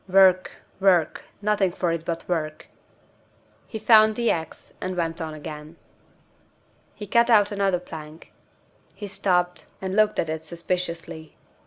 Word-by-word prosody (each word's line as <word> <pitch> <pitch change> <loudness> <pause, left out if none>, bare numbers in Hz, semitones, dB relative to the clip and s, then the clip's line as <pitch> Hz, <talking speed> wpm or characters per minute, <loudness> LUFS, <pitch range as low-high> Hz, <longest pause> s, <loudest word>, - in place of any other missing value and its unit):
"Work, 185 -1 +5 0.3
work! 185 -5 +3 0.2
Nothing 210 -2 +2
for 175 -1 -1
it 165 -1 -3
but 165 -1 -4
work." 155 -3 -3 1.0
He 220 - -6
found 220 -1 +5
the 235 0 +2
ax, 160 -1 -5
and 185 -1 -3
went 165 0 -1
on 160 -1 -5
again. 150 +1 -9 1.2
He 210 - -7
cut 235 +4 +3
out 210 -3 +5
another 195 -3 +1
plank. 160 -2 -11 0.6
He 205 - -7
stopped, 180 -2 0
and 190 0 -4
looked 215 0 +3
at - - 0
it 160 0 -4
suspiciously. 170 -2 -5
180 Hz, 140 wpm, -24 LUFS, 165-200 Hz, 1.2 s, Work